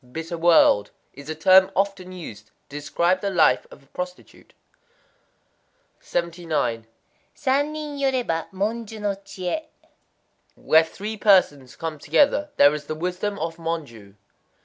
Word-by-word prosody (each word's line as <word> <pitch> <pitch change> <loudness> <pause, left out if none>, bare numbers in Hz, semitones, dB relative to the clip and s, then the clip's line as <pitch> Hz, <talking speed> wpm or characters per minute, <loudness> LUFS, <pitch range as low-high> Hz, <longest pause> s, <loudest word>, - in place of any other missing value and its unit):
"bitter 165 +1 -5
world") 165 -11 +4 0.2
is 140 +2 -12
a 155 - -3
term 190 +2 +6
often 195 -1 -1
used 115 - -10
to - - -33 0.2
describe 170 +6 0
the 200 - -1
life 175 -5 +3
of 140 - -16
a - - -24
prostitute. 180 +5 -9 1.5
79.—San 170 - -3
nin 300 -2 -6
yoréba, 255 -12 -1
Monjū 220 +3 -3
no 205 -1 -1
chié. 195 - -5 0.9
Where 160 +1 +4
three 205 +7 -7
persons 165 - +3
come 160 -2 -5
together, 290 - +2
there 145 +1 +6
is 150 -1 -5
the 155 - -3
wisdom 180 +5 -3
of 165 -1 -4
Monjū. 145 -12 -6
175 Hz, 125 wpm, -23 LUFS, 155-200 Hz, 1.5 s, term